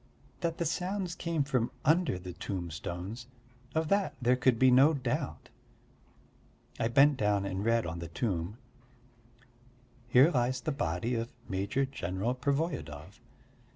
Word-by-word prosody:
That 165 Hz, -1 st, -2 dB
the 170 Hz, -, -1 dB
sounds 180 Hz, +3 st, -2 dB
came 170 Hz, -4 st, -1 dB
from 130 Hz, -5 st, 0 dB, 0.2 s
under 160 Hz, -, +3 dB
the 90 Hz, 0 st, -8 dB
tombstones 90 Hz, +5 st, -5 dB, 0.5 s
of 160 Hz, 0 st, +1 dB
that 200 Hz, 0 st, +1 dB
there 125 Hz, -1 st, +3 dB
could 125 Hz, -2 st, +3 dB
be 130 Hz, +2 st, +5 dB
no 140 Hz, +5 st, +6 dB
doubt. 135 Hz, -, -3 dB, 1.3 s
I 115 Hz, -, +2 dB
bent 140 Hz, +4 st, +5 dB
down 105 Hz, -3 st, +1 dB
and 95 Hz, 0 st, -3 dB
read 115 Hz, +1 st, +2 dB
on 85 Hz, +1 st, -4 dB
the 85 Hz, -, -5 dB
tomb: 90 Hz, +1 st, -2 dB, 1.5 s
"Here 130 Hz, +7 st, +6 dB
lies 125 Hz, -2 st, +1 dB
the 155 Hz, -, -2 dB
body 100 Hz, -, -1 dB
of 115 Hz, 0 st, -2 dB, 0.2 s
Major 100 Hz, +8 st, 0 dB
General 100 Hz, -3 st, -2 dB
Pervoyedov 130 Hz, -, -3 dB
125 Hz, 135 wpm, -31 LUFS, 95-145 Hz, 1.5 s, no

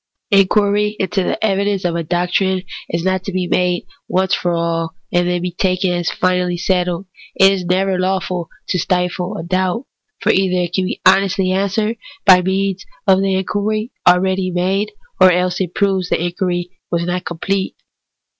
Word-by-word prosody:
Inquiry 205 Hz, +1 st, +3 dB
into 190 Hz, +1 st, 0 dB
the 185 Hz, -, -1 dB
evidence 200 Hz, -1 st, 0 dB
of 170 Hz, -1 st, 0 dB
a 170 Hz, -, 0 dB
doctrine 180 Hz, +3 st, 0 dB, 0.3 s
is 170 Hz, 0 st, -2 dB
not 190 Hz, 0 st, 0 dB
to 200 Hz, -, -3 dB
be 185 Hz, -1 st, -1 dB
made 180 Hz, 0 st, 0 dB, 0.2 s
once 190 Hz, 0 st, +1 dB
for 175 Hz, -, +1 dB
all, 165 Hz, -1 st, -1 dB, 0.2 s
and 175 Hz, 0 st, +2 dB
then 175 Hz, 0 st, -1 dB, 0.2 s
taken 185 Hz, -1 st, +1 dB
as 175 Hz, -1 st, 0 dB
finally 180 Hz, -1 st, 0 dB
settled. 180 Hz, 0 st, 0 dB, 0.3 s
It 195 Hz, 0 st, +6 dB
is 185 Hz, -2 st, -3 dB
never 185 Hz, +1 st, +1 dB
lawful 185 Hz, -2 st, -1 dB, 0.2 s
to 180 Hz, -, 0 dB
stifle 180 Hz, +2 st, -1 dB
a -, -, -5 dB
doubt; 185 Hz, +7 st, -1 dB, 0.3 s
for 220 Hz, -1 st, +2 dB
either 190 Hz, -2 st, +2 dB
it 175 Hz, -1 st, -3 dB
can 190 Hz, -1 st, +1 dB
be 210 Hz, -, -4 dB
honestly 190 Hz, 0 st, +4 dB
answered 200 Hz, +4 st, 0 dB, 0.3 s
by 185 Hz, -2 st, +8 dB
means 190 Hz, +1 st, -1 dB, 0.2 s
of 190 Hz, -1 st, +4 dB
the 195 Hz, -1 st, +1 dB
inquiry 215 Hz, +4 st, -1 dB, 0.2 s
already 185 Hz, +1 st, +3 dB
made, 190 Hz, +4 st, 0 dB, 0.3 s
or 185 Hz, -1 st, +7 dB
else 180 Hz, +1 st, 0 dB
it 180 Hz, -2 st, -3 dB
proves 190 Hz, -3 st, +1 dB
that -, -, +2 dB
the 170 Hz, -, -2 dB
inquiry 175 Hz, 0 st, -2 dB, 0.2 s
was 170 Hz, -1 st, 0 dB
not 180 Hz, 0 st, -2 dB
com 170 Hz, +1 st, -6 dB
plete. 195 Hz, +3 st, -1 dB
185 Hz, 175 wpm, -18 LUFS, 180-195 Hz, 0.3 s, by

